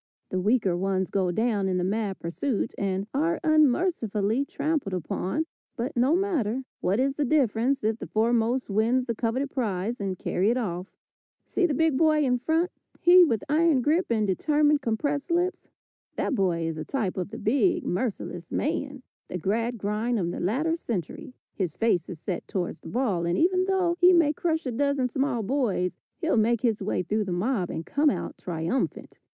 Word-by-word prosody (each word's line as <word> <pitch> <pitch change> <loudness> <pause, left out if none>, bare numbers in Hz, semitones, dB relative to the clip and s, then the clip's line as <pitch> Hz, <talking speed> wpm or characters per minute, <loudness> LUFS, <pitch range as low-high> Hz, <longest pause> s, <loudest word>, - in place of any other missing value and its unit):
The 185 - -1
weaker 205 -2 +2
ones 190 +1 -1
go 190 -2 +1
down 210 -1 0
in 185 - 0
the 180 - 0
mad 200 +1 -1
pursuit, 200 +8 -2
and 195 -1 -1
are 320 +5 +1
unmercifully 275 - +2
trampled 285 - -2
upon, 185 - -2 0.3
but 250 +4 -3
no 255 +6 +3
matter, 275 - 0 0.2
what 195 +5 0
is 270 +1 +2
the 295 - -1
difference 260 -2 +1
if 220 +1 0
the - - -6
foremost 235 +3 +1
win 225 +5 +2
the 235 - -1
coveted 250 +5 -1
prize 215 -3 -2
and 190 -2 -2
carry 190 +4 0
it 240 - +2
off. 180 -6 -3 0.6
See 365 - +1
the 295 - -1
big 315 -2 +2
boy 310 -2 +4
in 250 -2 +1
front, 325 +7 +1 0.3
he 355 +1 +7
with 230 - +1
iron 305 -3 +3
grip, 325 +7 +2
and 220 -2 +1
determined, 295 - +2
compressed 280 +6 -1
lips? 350 +2 -1 0.5
That - - -1
boy 180 -7 +1
is 165 -1 -3
a - - -3
type 215 - -2
of 185 0 -3
the 220 - -7
big, 285 - +2
merciless 180 -4 -3
man, 280 -2 -2 0.2
the 180 - -4
Gradgrind 225 +3 -1
of 175 -4 -1
the - - -5
latter 285 - 0
century. 235 - -5 0.2
His 180 -5 -3
face 205 -7 +1
is 175 -4 -7
set 180 +2 -4
towards 180 -3 -3
the - - -10
ball, 205 -9 0
and 170 - 0
even 370 +2 +3
though 375 -3 +1
he 360 +1 +7
may 325 -4 +4
crush 320 0 -1
a 255 - -2
dozen 280 +1 0
small 265 -2 -1
boys, 210 -7 -1 0.2
he'll 330 -7 0
make 225 +1 +2
his 230 -4 +1
way 190 -2 -1
through 210 +4 -1
the 190 - -4
mob 185 +1 0
and 160 - -5
come 295 +1 +2
out - - -3
triumphant. 170 +8 -3
235 Hz, 185 wpm, -26 LUFS, 195-290 Hz, 0.6 s, he